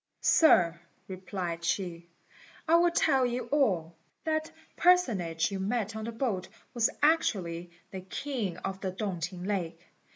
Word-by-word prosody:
"Sir," 175 - +5 0.3
replied 185 -2 -5
she, 170 -1 -2 0.6
"I 320 - +2
will 345 +1 +4
tell 280 -6 +3
you 245 -1 -1
all. 185 - +1 0.3
That 315 0 -1 0.2
personage 195 - +2
you 195 - -3
met 215 +2 -1
on 220 0 -4
the 230 - -4
boat 225 -6 -2 0.3
was 235 -3 +2
actually 180 - +1 0.2
the 190 - -6
king 200 -1 -4
of 190 +1 -5
the 190 - -2
Tung 190 -2 -3
t'ing 175 +2 -5
lake. 180 -4 -2
195 Hz, 140 wpm, -29 LUFS, 175-250 Hz, 0.6 s, Sir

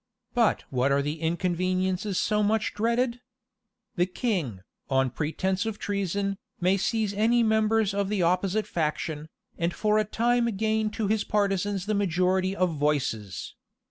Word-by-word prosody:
But 235 -3 +2
what 130 +1 +1
are 140 0 +2
the 150 +2 -3
inconveniencies 185 +3 0
so 210 0 +1
much 215 +1 +1
dreaded? 235 +3 0 0.8
The 175 +1 +3
king, 180 - -2 0.3
on 135 -2 +2
pretence 185 +7 -1
of 220 -2 -3
treason, 200 0 -2 0.2
may 185 +2 +3
seize 210 +1 0
any 230 +3 +3
members 220 -1 +2
of 200 -1 -1
the 205 -4 +1
opposite 185 +4 +1
faction, 155 -1 -2 0.3
and 170 +1 +1
for 215 0 +2
a - - +3
time 235 +3 +1
gain 220 0 +1
to 220 - 0
his 215 +1 +1
partisans 200 -2 0
the 215 - 0
majority 185 -1 +1
of 180 -4 +1
voices. 125 - -1
195 Hz, 145 wpm, -27 LUFS, 170-215 Hz, 0.8 s, The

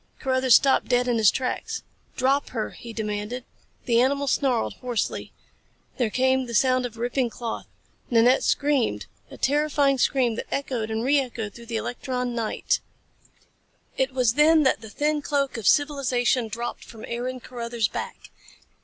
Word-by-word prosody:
Carruthers 260 -2 +4
stopped 270 -1 +3
dead 245 0 +2
in 240 -2 +1
his 215 -3 +6
tracks. 255 -1 -3 0.3
"Drop 270 +3 +1
her!" 225 -4 -3
he 235 - -10
demanded. 215 +2 -4 0.4
The 235 -1 +3
animal 280 +2 +1
snarled 260 -4 +1
hoarsely. 245 -4 -2 0.7
There 245 -4 +1
came 260 +2 +1
the 235 - -4
sound 255 +1 +3
of 235 -1 -15
ripping 245 +1 0
cloth. 230 0 -5 0.4
Nanette 240 +2 +4
screamed 285 -5 +1 0.2
a - - -11
terrifying 285 -1 +2
scream 245 -4 +2
that - - -5
echoed 250 -5 -2
and 220 +1 -2
re 280 +3 +4
echoed 230 -6 -4
through 235 0 -12
the 230 -1 -2
electron 250 +1 -3
night. 230 -2 -1 1.2
It 265 0 0
was 250 -3 +2
then 305 +3 +5
that 265 - +2
the 220 - -9
thin 295 +5 0
cloak 280 -1 -1
of 225 -4 -3
civilization 260 -5 +2
dropped 235 +3 -5
from 225 -2 -11
Aaron 250 +2 -4
Carruthers' 235 -3 -2
back. 475 - -7
250 Hz, 155 wpm, -25 LUFS, 235-270 Hz, 1.2 s, his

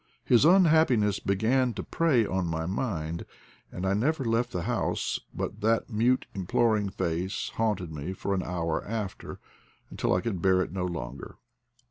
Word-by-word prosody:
His 120 +3 +5
unhappiness 160 - +4
began 115 +5 +1
to - - -4
prey 145 -9 +2
on 95 -2 -1
my 80 0 -2
mind, 85 -5 -3 0.5
and 90 - -5
I 95 - +2
never 135 +7 0
left 115 +2 +1
the 90 - -3
house - - -1
but - - -5
that 115 +3 +1
mute 120 +4 +2
imploring 105 +2 +1
face 90 +2 -2
haunted 105 -7 -1
me 75 +4 -5
for 100 +1 -3
an 95 - 0
hour 85 -3 -2
after, 105 -3 -5 0.5
until - - 0
I 90 - +1
could 100 -6 -3
bear 95 0 +4
it - - -8
no 90 0 -2
longer. 70 -6 -6
100 Hz, 160 wpm, -28 LUFS, 90-120 Hz, 0.5 s, His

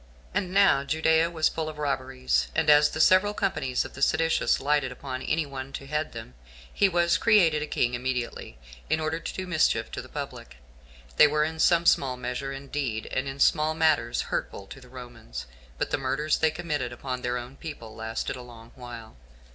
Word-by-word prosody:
8. - - 0
And 180 - -5
now 195 -7 +4
Judea 160 +3 +2
was 160 -2 +1
full 160 -1 -3
of 155 - -9
robberies; 130 -3 -1
and 155 -1 +4
as 150 0 +6
the 155 - -6
several 185 +5 +5
companies 130 -9 -1
of - - -9
the 140 - -10
seditious 160 +3 +2
lighted 145 -1 +1
upon 130 0 -6
any 155 +3 0
one 135 -1 -7
to 135 - -6
head 150 +2 -2
them, 115 - -9 0.4
he 200 - +3
was 175 -1 +2
created 175 -9 +4
a 150 - -3
king 125 -4 0
immediately, 125 - -3 0.3
in 160 - +2
order 155 +1 -2
to - - -6
do 190 - -4
mischief 170 -4 +1
to - - -5
the - - -13
public. - - -7 0.6
They 150 - +8
were 150 +1 +1
in 160 +1 -3
some 170 +1 +4
small 130 -6 +3
measure 125 +2 -4
indeed, 135 -4 -4
and 130 - -1
in 135 0 -6
small 155 +2 +3
matters, 155 -8 +2
hurtful 100 - -4
to 135 - -10
the 125 - -16
Romans; 120 - -9 0.3
but - - -2
the - - 0
murders 140 +3 0
they 160 - +4
committed 155 -6 -3
upon 125 +1 -5
their 125 0 -1
own 125 +2 -8
people 135 -9 -8
lasted 110 +3 -4
a 125 - -8
long 115 -2 -13
while. 120 - -10
140 Hz, 200 wpm, -27 LUFS, 125-160 Hz, 0.6 s, They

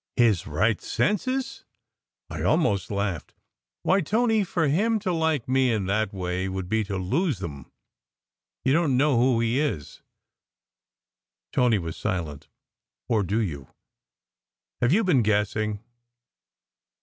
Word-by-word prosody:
"His 115 -7 +3
right 100 +8 +1
senses!" 255 +6 -1 0.6
I - - -6
almost 150 - +1
laughed. 100 -5 -3 0.5
"Why, 195 +1 +3
Tony, 220 +4 +2
for 170 -4 0
him 215 +10 +2
to 190 -3 -2
like 160 -6 0
me 130 -1 +2
in 105 -4 0
that 100 +1 0
way 90 0 -3
would 95 -1 -4
be 110 +3 +1
to 100 -1 -3
lose 135 - 0
them. 75 -8 -8 0.9
You 130 - +3
don 165 -1 +2
t 130 - +2
know 140 0 +3
who 125 -1 +3
he 115 +3 +1
is." 140 - -3 1.5
Tony 125 -4 +3
was 85 -4 -5
silent. 85 -8 -4 0.3
" 60 0 -57
Or 110 -2 +3
do 100 +4 0
you? 75 - -3 1.1
Have 120 +1 +3
you 215 +7 +4
been 160 -9 +3
guessing? 105 0 0
110 Hz, 135 wpm, -25 LUFS, 95-155 Hz, 1.5 s, you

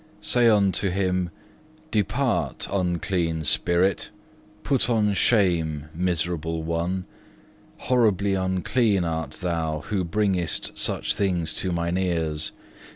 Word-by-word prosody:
Say 120 -1 +4
unto 100 -2 +2
him, 90 -1 0 0.6
'Depart 110 +5 0
unclean 90 -3 -1
spirit; 90 +6 +2 0.5
put 135 -3 +1
on 105 -3 +2
shame, 85 -9 +1
miserable 80 -2 -1
one; 85 +3 -2 0.7
horribly 105 -6 +2
unclean 95 +2 +1
art 80 -3 -3
thou, 80 -3 -1
who 95 +4 -2
bringest 90 -1 -1
such - - 0
things 90 -5 0
to 95 - -1
mine 85 +1 -1
ears. 80 -4 -1
90 Hz, 100 wpm, -25 LUFS, 85-100 Hz, 0.7 s, Say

